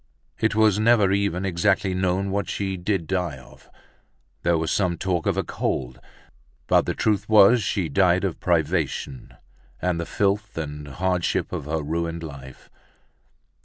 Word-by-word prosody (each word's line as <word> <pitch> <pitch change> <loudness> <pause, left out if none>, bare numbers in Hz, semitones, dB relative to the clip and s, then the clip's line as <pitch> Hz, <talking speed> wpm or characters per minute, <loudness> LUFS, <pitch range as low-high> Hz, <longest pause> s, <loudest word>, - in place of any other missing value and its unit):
It 110 -1 +1
was 110 -2 +4
never 110 -3 +4
even 100 -2 0
exactly 95 +1 +1
known 95 +1 0
what 100 0 -2
she 95 -1 -2
did 95 -1 -2
die 90 -5 -2
of. 65 - -17 0.7
There 85 -1 +2
was 80 0 -1
some 90 -4 0
talk 90 -3 -1
of - - +1
a - - +1
cold, 60 -1 -3 0.7
but - - +3
the - - -1
truth 105 -1 0
was 110 +2 +6
she 95 -5 -1
died 95 0 +2
of 95 -4 -2
privation 80 -6 -1 0.4
and 90 -2 -1
of 85 - -6
the - - -14
filth 100 0 0
and 75 -2 -5
hardship 90 +5 -1
of - - -4
her 80 0 -2
ruined 85 +2 -3
life. 70 -4 -11
90 Hz, 160 wpm, -24 LUFS, 80-100 Hz, 0.7 s, was